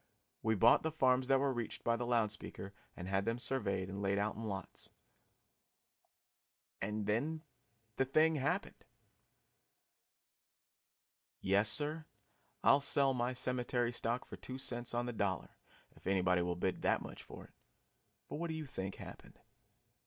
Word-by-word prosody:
We 110 0 +2
bought 115 +4 +6
the 160 - 0
farms 130 -4 +3
that 135 0 +5
were 140 -1 +2
reached 120 -3 -4
by 115 - +2
the 120 0 -3
loud 115 -3 +2
speaker 100 -1 -6 0.2
and 90 - -6
had 95 +1 +1
them 115 +3 0
surveyed 100 -7 -1
and 100 +1 -5
laid 100 0 +1
out 105 +1 +1
in 110 - -7
lots 100 -4 -5 1.9
and 105 +1 -2
then 145 +10 0 0.5
the 135 - +3
thing 155 +4 +4
happened! 155 +7 -1 2.6
Yes, 100 +3 +3
sir, 155 +4 0 0.6
I'll 140 - +6
sell 140 -1 +4
my 125 0 0
cemetery 125 -1 0
stock 120 +1 -2
for - - -9
two 130 - -6
cents 120 -2 -3
on 120 0 +1
the 120 - -3
dollar, 100 -4 -1 0.5
if - - -12
anybody 90 -2 +3
will 90 0 0
bid 90 +1 -1
that - - +2
much - - -8
for - - -10
it. - - -18 0.7
For - - -5
what 170 0 -2
do 160 - -2
you 160 -1 -4
think 95 -8 -5
happened? - - -11
120 Hz, 155 wpm, -36 LUFS, 100-135 Hz, 2.6 s, bought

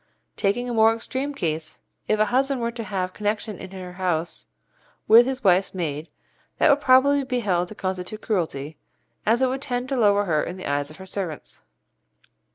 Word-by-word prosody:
Taking 240 +5 0
a 245 - -3
more 225 0 +5
extreme 260 +5 -3
case, 160 - -3 0.3
if 215 - +1
a 215 - +5
husband 270 +1 +2
were 235 0 -1
to 230 -1 -6
have 185 -3 -3
connection 210 -1 -3
in 190 - -8
her 185 -1 -8
house 175 -3 -2 0.6
with 235 +3 +8
his 265 -1 -3
wife's 190 0 +3
maid, 155 -3 -3 0.5
that 310 - +5
would 285 +1 +3
probably 275 +2 +5
be 250 -2 -2
held 180 -4 0
to 215 - -10
constitute 185 +2 -4
cruelty, 155 -7 -2 0.5
as 235 +4 +3
it - - +4
would 265 +1 -3
tend 245 -1 -2
to 275 - 0
lower 205 -4 +3
her 155 -5 +1
in 180 - -5
the 185 - -8
eyes 145 0 -1
of 155 - -13
her 190 - -10
servants. 185 -5 -6
205 Hz, 190 wpm, -24 LUFS, 180-245 Hz, 0.6 s, with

